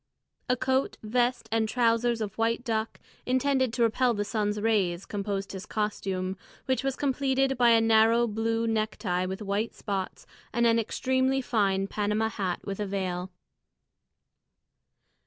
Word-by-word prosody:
A 250 Hz, -, +3 dB
coat, 260 Hz, +2 st, 0 dB
vest, 240 Hz, +1 st, 0 dB
and 220 Hz, -1 st, +1 dB
trousers 235 Hz, 0 st, +2 dB
of 210 Hz, -1 st, -4 dB
white 230 Hz, +2 st, 0 dB
duck, 225 Hz, -3 st, -2 dB, 0.3 s
intended 260 Hz, 0 st, +2 dB
to 235 Hz, -, +1 dB
repel 235 Hz, +2 st, +2 dB
the 205 Hz, 0 st, -1 dB
sun's 210 Hz, -1 st, -1 dB
rays, 195 Hz, -5 st, +1 dB
composed 200 Hz, -1 st, -3 dB
his 195 Hz, +1 st, -7 dB
costume, 195 Hz, -3 st, -2 dB, 0.3 s
which 260 Hz, 0 st, 0 dB
was 270 Hz, -1 st, -1 dB
completed 270 Hz, -1 st, +1 dB
by 240 Hz, -1 st, +4 dB
a 230 Hz, -1 st, +6 dB
narrow 225 Hz, +1 st, +4 dB
blue 225 Hz, +1 st, -1 dB
necktie 215 Hz, -5 st, -1 dB
with 190 Hz, +3 st, -5 dB
white 205 Hz, +3 st, -2 dB
spots, 195 Hz, -3 st, -4 dB, 0.3 s
and 235 Hz, 0 st, +2 dB
an 230 Hz, 0 st, +4 dB
extremely 260 Hz, +4 st, +1 dB
fine 200 Hz, -6 st, +1 dB
Panama 210 Hz, +2 st, 0 dB
hat 190 Hz, -5 st, -3 dB
with 195 Hz, 0 st, -4 dB
a 205 Hz, -, -2 dB
veil. 185 Hz, -2 st, -3 dB
225 Hz, 145 wpm, -28 LUFS, 200-240 Hz, 0.3 s, a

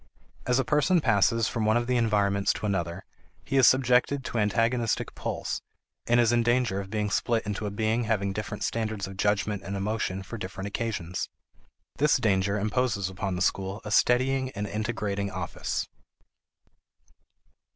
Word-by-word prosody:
As 125 Hz, 0 st, +3 dB
a 135 Hz, -, +1 dB
person 150 Hz, +4 st, +3 dB
passes 115 Hz, -3 st, +3 dB
from 115 Hz, -, -2 dB
one 110 Hz, +2 st, +3 dB
of 120 Hz, -, 0 dB
the 125 Hz, +1 st, 0 dB
environments 100 Hz, -4 st, +2 dB
to -, -, -5 dB
another, 95 Hz, -2 st, -2 dB, 0.4 s
he -, -, -3 dB
is 130 Hz, -, +7 dB
subjected 130 Hz, +1 st, +3 dB
to 120 Hz, -, -2 dB
antagonistic 115 Hz, +3 st, +1 dB
pulls, -, -, -3 dB, 0.5 s
and 120 Hz, +1 st, +4 dB
is 120 Hz, -1 st, +4 dB
in 120 Hz, 0 st, +3 dB
danger 120 Hz, -4 st, +1 dB
of 95 Hz, -, -9 dB
being 105 Hz, -1 st, -1 dB
split 115 Hz, +1 st, 0 dB
into 105 Hz, +1 st, -3 dB
a -, -, -1 dB
being 110 Hz, +3 st, 0 dB
having 100 Hz, -3 st, 0 dB
different 105 Hz, 0 st, -4 dB
standards 110 Hz, -3 st, -2 dB
of 95 Hz, 0 st, -8 dB
judgment 105 Hz, 0 st, 0 dB
and 100 Hz, -, -5 dB
emotion 100 Hz, -1 st, -2 dB
for 115 Hz, +4 st, -7 dB
different 95 Hz, 0 st, -6 dB
occasions. 100 Hz, -5 st, -3 dB, 0.7 s
This 145 Hz, 0 st, +4 dB
danger 100 Hz, -4 st, +1 dB
imposes 105 Hz, -2 st, 0 dB
upon 95 Hz, 0 st, -3 dB
the 90 Hz, -, 0 dB
school 95 Hz, +2 st, -1 dB
a 105 Hz, -, -5 dB
steadying 130 Hz, +3 st, +3 dB
and 105 Hz, +1 st, -3 dB
integrating 105 Hz, -2 st, -2 dB
office. 95 Hz, -3 st, -3 dB
105 Hz, 160 wpm, -27 LUFS, 100-120 Hz, 0.7 s, is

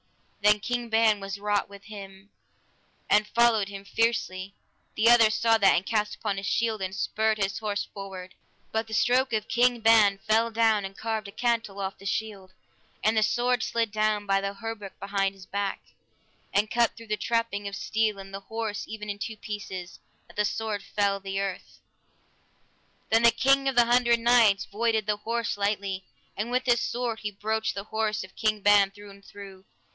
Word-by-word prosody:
Then 210 Hz, 0 st, +5 dB
King 240 Hz, +2 st, -3 dB
Ban 220 Hz, -2 st, +3 dB
was 195 Hz, 0 st, -5 dB
wroth 205 Hz, 0 st, 0 dB
with 200 Hz, 0 st, -13 dB
him, 200 Hz, -1 st, -11 dB, 0.8 s
and 210 Hz, 0 st, +3 dB
followed 230 Hz, -2 st, +3 dB
on 200 Hz, -, -10 dB
him 195 Hz, 0 st, -9 dB
fiercely; 200 Hz, -3 st, -1 dB, 0.4 s
the 220 Hz, -, +2 dB
other 235 Hz, -2 st, +7 dB
saw 225 Hz, +1 st, +2 dB
that, 195 Hz, -, +5 dB
and 185 Hz, -, 0 dB
cast 210 Hz, -1 st, -1 dB
up 205 Hz, -2 st, +1 dB
his 195 Hz, 0 st, -4 dB
shield, 225 Hz, -3 st, 0 dB
and 190 Hz, 0 st, -3 dB
spurred 220 Hz, +2 st, 0 dB
his 195 Hz, -1 st, -1 dB
horse 210 Hz, -2 st, -2 dB
forward, 190 Hz, -2 st, -8 dB, 0.4 s
but 220 Hz, 0 st, -1 dB
the 220 Hz, -, -4 dB
stroke 255 Hz, +4 st, +2 dB
of 215 Hz, -1 st, -1 dB
King 245 Hz, 0 st, +2 dB
Ban 215 Hz, -3 st, +5 dB
fell 220 Hz, +3 st, +1 dB
down 225 Hz, -2 st, +2 dB
and 195 Hz, 0 st, -7 dB
carved 220 Hz, -2 st, -3 dB
a -, -, -9 dB
cantel 230 Hz, -4 st, -1 dB
off 195 Hz, 0 st, -4 dB
the 195 Hz, -, -7 dB
shield, 200 Hz, -3 st, -4 dB, 0.5 s
and 215 Hz, +1 st, +3 dB
the 220 Hz, -, +3 dB
sword 245 Hz, +2 st, +1 dB
slid 230 Hz, -2 st, -1 dB
down 215 Hz, -1 st, 0 dB
by 195 Hz, 0 st, +2 dB
the 200 Hz, 0 st, -3 dB
hauberk 225 Hz, -2 st, -7 dB
behind 195 Hz, 0 st, -1 dB
his 190 Hz, -1 st, -13 dB
back, 200 Hz, 0 st, -3 dB, 0.7 s
and 210 Hz, +2 st, +1 dB
cut 235 Hz, -1 st, +2 dB
through 230 Hz, -1 st, -12 dB
the 210 Hz, -, 0 dB
trapping 230 Hz, -2 st, -1 dB
of 200 Hz, -, -5 dB
steel 215 Hz, -1 st, 0 dB
and 195 Hz, 0 st, -10 dB
the 195 Hz, -, -4 dB
horse 220 Hz, 0 st, -5 dB
even 215 Hz, -1 st, -7 dB
in 205 Hz, 0 st, -4 dB
two 220 Hz, 0 st, -5 dB
pieces, 195 Hz, -4 st, -7 dB, 0.3 s
that -, -, -19 dB
the 210 Hz, -, +1 dB
sword 215 Hz, -1 st, -2 dB
felt 200 Hz, -1 st, 0 dB
the 195 Hz, 0 st, -3 dB
earth. 195 Hz, -2 st, -5 dB, 1.3 s
Then 225 Hz, +1 st, +5 dB
the 235 Hz, -, +7 dB
King 275 Hz, +3 st, +2 dB
of 270 Hz, -, 0 dB
the 240 Hz, -1 st, +6 dB
Hundred 235 Hz, 0 st, +3 dB
Knights 230 Hz, -4 st, +4 dB
voided 220 Hz, 0 st, 0 dB
the 210 Hz, 0 st, 0 dB
horse 230 Hz, +1 st, -2 dB
lightly, 200 Hz, -2 st, -2 dB, 0.3 s
and 215 Hz, +4 st, -3 dB
with 255 Hz, +1 st, 0 dB
his 240 Hz, -1 st, +3 dB
sword 240 Hz, -2 st, -2 dB
he 210 Hz, -, -3 dB
broached 220 Hz, +2 st, -2 dB
the 200 Hz, -, -4 dB
horse 220 Hz, -2 st, -1 dB
of 190 Hz, -, -14 dB
King 215 Hz, -2 st, 0 dB
Ban 205 Hz, -1 st, +5 dB
through 205 Hz, +1 st, -13 dB
and 200 Hz, 0 st, -16 dB
through. 195 Hz, -1 st, -12 dB
210 Hz, 195 wpm, -27 LUFS, 200-225 Hz, 1.3 s, other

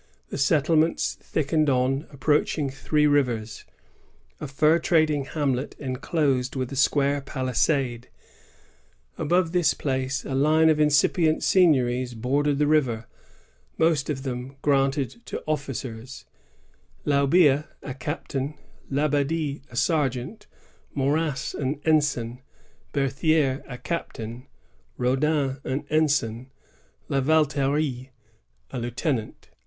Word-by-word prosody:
The -, -, -5 dB
settlements 155 Hz, +3 st, +2 dB
thickened 155 Hz, 0 st, 0 dB
on 135 Hz, +3 st, +1 dB
approaching 145 Hz, 0 st, 0 dB
Three 150 Hz, +2 st, +1 dB
Rivers, 125 Hz, -7 st, 0 dB, 0.7 s
a -, -, -5 dB
fur 150 Hz, +4 st, +3 dB
trading 155 Hz, -4 st, +2 dB
hamlet 140 Hz, -3 st, -2 dB
enclosed 130 Hz, -1 st, -1 dB
with 130 Hz, -1 st, -3 dB
a -, -, -5 dB
square 140 Hz, +1 st, +2 dB
palisade. 130 Hz, -2 st, -1 dB, 1.1 s
Above 170 Hz, +2 st, +1 dB
this 175 Hz, -4 st, +2 dB
place, 130 Hz, -1 st, -2 dB
a 135 Hz, -, -4 dB
line 155 Hz, +4 st, +4 dB
of 155 Hz, -, 0 dB
incipient 155 Hz, +2 st, +3 dB
seigniories 130 Hz, -9 st, +3 dB
bordered 140 Hz, +5 st, 0 dB
the 150 Hz, -, +2 dB
river, 130 Hz, -7 st, +1 dB, 0.7 s
most 160 Hz, -3 st, +2 dB
of 135 Hz, -3 st, -3 dB
them 130 Hz, 0 st, -5 dB
granted 140 Hz, -, +1 dB
to -, -, -5 dB
officers, 135 Hz, -4 st, -5 dB, 0.4 s
— -, -, -36 dB
Laubia, 145 Hz, +1 st, +4 dB, 0.2 s
a 135 Hz, -, -5 dB
captain; 145 Hz, 0 st, -4 dB, 0.3 s
Labadie, 145 Hz, +1 st, 0 dB
a 120 Hz, -, -12 dB
sergeant; 140 Hz, -, -1 dB, 0.5 s
Moras, 145 Hz, +1 st, 0 dB
an 140 Hz, 0 st, -2 dB
ensign; 145 Hz, -6 st, +1 dB, 0.5 s
Berthier, 140 Hz, 0 st, +1 dB
a 125 Hz, -, -7 dB
captain; 120 Hz, -7 st, -5 dB, 0.5 s
Raudin, 135 Hz, +2 st, +1 dB
an 135 Hz, +3 st, -3 dB
ensign; 135 Hz, -6 st, +1 dB, 0.6 s
La 135 Hz, -, 0 dB
Valterie, 145 Hz, -2 st, +1 dB, 0.6 s
a -, -, -4 dB
lieuten 120 Hz, +3 st, -1 dB
ant. 110 Hz, -, -12 dB
140 Hz, 110 wpm, -25 LUFS, 130-155 Hz, 1.1 s, line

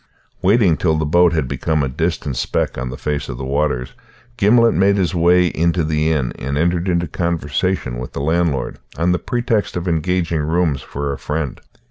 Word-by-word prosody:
Waiting 95 Hz, -5 st, +4 dB
till 80 Hz, -3 st, +1 dB
the 80 Hz, -, 0 dB
boat 85 Hz, +3 st, +4 dB
had 80 Hz, -5 st, 0 dB
become 80 Hz, +3 st, -1 dB
a -, -, 0 dB
distant 75 Hz, 0 st, -2 dB
speck -, -, -1 dB
on 60 Hz, +1 st, -4 dB
the 65 Hz, -, -6 dB
face 75 Hz, -1 st, -3 dB
of 65 Hz, -, -5 dB
the 65 Hz, -, -5 dB
waters, 65 Hz, -2 st, -1 dB, 0.4 s
Gimblet 115 Hz, +1 st, +4 dB
made 100 Hz, +1 st, +3 dB
his 95 Hz, -2 st, 0 dB
way 90 Hz, +1 st, +4 dB
into 85 Hz, 0 st, +1 dB
the 80 Hz, +1 st, +1 dB
inn 70 Hz, -6 st, 0 dB
and 70 Hz, +2 st, -3 dB
entered 85 Hz, +3 st, +1 dB
into 85 Hz, -1 st, +1 dB
conversation 80 Hz, -4 st, -1 dB
with 65 Hz, -, -7 dB
the -, -, -4 dB
landlord, 80 Hz, -3 st, 0 dB, 0.2 s
on 85 Hz, +3 st, +2 dB
the 90 Hz, -, +1 dB
pretext 120 Hz, -6 st, -1 dB
of 90 Hz, +1 st, -4 dB
engaging 85 Hz, -1 st, 0 dB
rooms 80 Hz, -3 st, 0 dB
for 70 Hz, 0 st, -4 dB
a -, -, -7 dB
friend. 75 Hz, -3 st, -3 dB
80 Hz, 190 wpm, -19 LUFS, 70-90 Hz, 0.4 s, Waiting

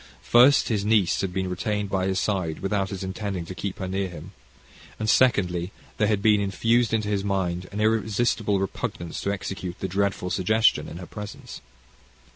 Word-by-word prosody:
First, 125 Hz, +4 st, +5 dB
his 105 Hz, -4 st, 0 dB
niece 105 Hz, -4 st, +2 dB
had 95 Hz, -2 st, -2 dB
been 95 Hz, +1 st, -2 dB
retained 100 Hz, +3 st, -2 dB
by 95 Hz, -1 st, 0 dB
his 95 Hz, -1 st, 0 dB
side 95 Hz, -7 st, -1 dB
without 95 Hz, 0 st, 0 dB
his 95 Hz, -1 st, -5 dB
intending 95 Hz, -2 st, -4 dB
to 95 Hz, -, -7 dB
keep 95 Hz, +1 st, -5 dB
her 95 Hz, -, -4 dB
near 95 Hz, +1 st, -1 dB
him; 85 Hz, +2 st, -10 dB, 0.7 s
and, 110 Hz, -, -3 dB
secondly, 95 Hz, -7 st, +2 dB, 0.3 s
there 105 Hz, -4 st, +2 dB
had 105 Hz, -2 st, 0 dB
been 105 Hz, -2 st, +5 dB
infused 115 Hz, +4 st, +1 dB
into 110 Hz, -2 st, 0 dB
his 100 Hz, -2 st, 0 dB
mind 95 Hz, -2 st, -2 dB
an 105 Hz, -, -5 dB
irresistible 110 Hz, -1 st, +1 dB
repugnance 85 Hz, -3 st, -4 dB
to 100 Hz, -, -1 dB
execute 95 Hz, -2 st, -5 dB
the 95 Hz, -, -2 dB
dreadful 95 Hz, -1 st, -1 dB
suggestion 110 Hz, +4 st, +2 dB
in 80 Hz, -, -8 dB
her 90 Hz, -, -7 dB
presence. 105 Hz, +2 st, -9 dB
100 Hz, 180 wpm, -25 LUFS, 95-105 Hz, 0.7 s, First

